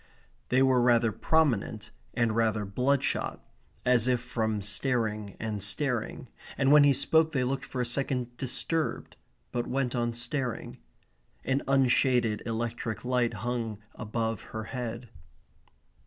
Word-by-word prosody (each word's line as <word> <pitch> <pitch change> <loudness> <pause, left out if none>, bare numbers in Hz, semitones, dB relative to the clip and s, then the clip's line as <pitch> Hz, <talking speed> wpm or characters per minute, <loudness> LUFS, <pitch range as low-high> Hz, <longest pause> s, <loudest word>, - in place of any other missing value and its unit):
They 130 +1 +4
were 130 -2 +4
rather 120 -2 +4
prominent, 120 -8 +1 0.2
and 115 -3 +1
rather 110 -2 +1
bloodshot, 125 +8 0 0.4
as 125 -1 +4
if 125 -1 +3
from 110 -4 -2
staring 105 -2 -1
and 110 -2 -3
staring, 120 +4 -2 0.3
and 135 0 +3
when 150 0 +8
he 145 - +6
spoke 160 +4 +3
they 130 -3 +1
looked 135 +2 -2
for 125 - -3
a - - 0
second 125 -1 -2
disturbed, 150 +5 -2 0.4
but 120 -1 -2
went 130 -2 -1
on 120 -1 0
staring. 120 0 -3 0.7
An 135 +1 +1
unshaded 125 -4 +3
electric 115 0 -3
light 125 -2 +1
hung 115 -3 -2 0.2
above 110 -1 -3
her 110 0 -6
head. 120 -1 -4
120 Hz, 130 wpm, -29 LUFS, 115-130 Hz, 0.7 s, when